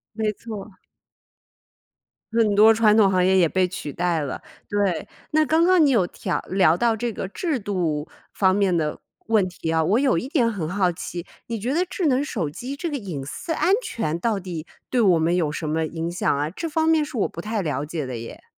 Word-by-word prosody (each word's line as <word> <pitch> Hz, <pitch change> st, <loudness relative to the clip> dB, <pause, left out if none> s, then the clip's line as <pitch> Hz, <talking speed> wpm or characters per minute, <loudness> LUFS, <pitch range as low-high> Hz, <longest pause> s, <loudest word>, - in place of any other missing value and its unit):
没 215 Hz, -1 st, 0 dB
错 215 Hz, -1 st, -7 dB
儿。 205 Hz, -, -17 dB, 1.6 s
很 220 Hz, -3 st, +3 dB
多 220 Hz, +2 st, +7 dB
传 215 Hz, -1 st, +4 dB
统 205 Hz, -3 st, +5 dB
行 185 Hz, -1 st, +2 dB
业 190 Hz, +1 st, +4 dB
也 175 Hz, -3 st, +5 dB
被 185 Hz, +1 st, +1 dB
取 150 Hz, -6 st, -6 dB
代 175 Hz, -2 st, 0 dB
了， 140 Hz, -3 st, -4 dB, 0.3 s
对。 200 Hz, -5 st, 0 dB, 0.2 s
那 310 Hz, 0 st, +3 dB
刚 320 Hz, +3 st, +3 dB
刚 360 Hz, -3 st, +5 dB
你 280 Hz, -, +4 dB
有 205 Hz, -8 st, +3 dB
调 -, -, -3 dB
聊 180 Hz, -4 st, +4 dB
到 230 Hz, +2 st, +2 dB
这 235 Hz, +1 st, -2 dB
个 190 Hz, -, -5 dB
制 310 Hz, -, -2 dB
度 175 Hz, -7 st, -2 dB, 0.2 s
方 190 Hz, -1 st, +3 dB
面 195 Hz, -4 st, +2 dB
的 150 Hz, -2 st, -1 dB, 0.3 s
问 215 Hz, -4 st, +3 dB
题 165 Hz, -2 st, -5 dB
啊， 160 Hz, 0 st, +2 dB
我 210 Hz, +8 st, +3 dB
有 260 Hz, -10 st, +2 dB
一 250 Hz, -, -3 dB
点 250 Hz, -7 st, +2 dB
很 180 Hz, -8 st, -3 dB
好 185 Hz, -1 st, +1 dB
奇， 170 Hz, 0 st, -6 dB, 0.2 s
你 230 Hz, -1 st, -3 dB
觉 235 Hz, +6 st, -2 dB
得 345 Hz, +5 st, +2 dB
智 365 Hz, -1 st, -2 dB
能 270 Hz, 0 st, +2 dB
手 185 Hz, -, -3 dB
机 245 Hz, -, -6 dB
这 330 Hz, +3 st, -4 dB
个 290 Hz, -, -2 dB
隐 180 Hz, -, -5 dB
私 230 Hz, -, -5 dB
安 370 Hz, +4 st, +3 dB
全 170 Hz, -, -2 dB
到 210 Hz, 0 st, 0 dB
底 175 Hz, -3 st, -6 dB, 0.2 s
对 250 Hz, -, +2 dB
我 185 Hz, -7 st, +5 dB
们 165 Hz, +2 st, +2 dB
有 160 Hz, -4 st, 0 dB
什 155 Hz, 0 st, -4 dB
么 160 Hz, +1 st, 0 dB
影 165 Hz, +1 st, -4 dB
响 175 Hz, -4 st, 0 dB
啊？ 145 Hz, +2 st, -1 dB
这 330 Hz, -, -5 dB
方 320 Hz, +1 st, +1 dB
面 320 Hz, -2 st, +4 dB
是 295 Hz, -3 st, -8 dB
我 -, -, +1 dB
不 170 Hz, -, -8 dB
太 215 Hz, +1 st, -2 dB
了 145 Hz, -3 st, -2 dB
解 155 Hz, -1 st, -4 dB
的 125 Hz, -, -5 dB
耶。 115 Hz, -, -9 dB
195 Hz, 240 characters per minute, -23 LUFS, 170-235 Hz, 1.6 s, 多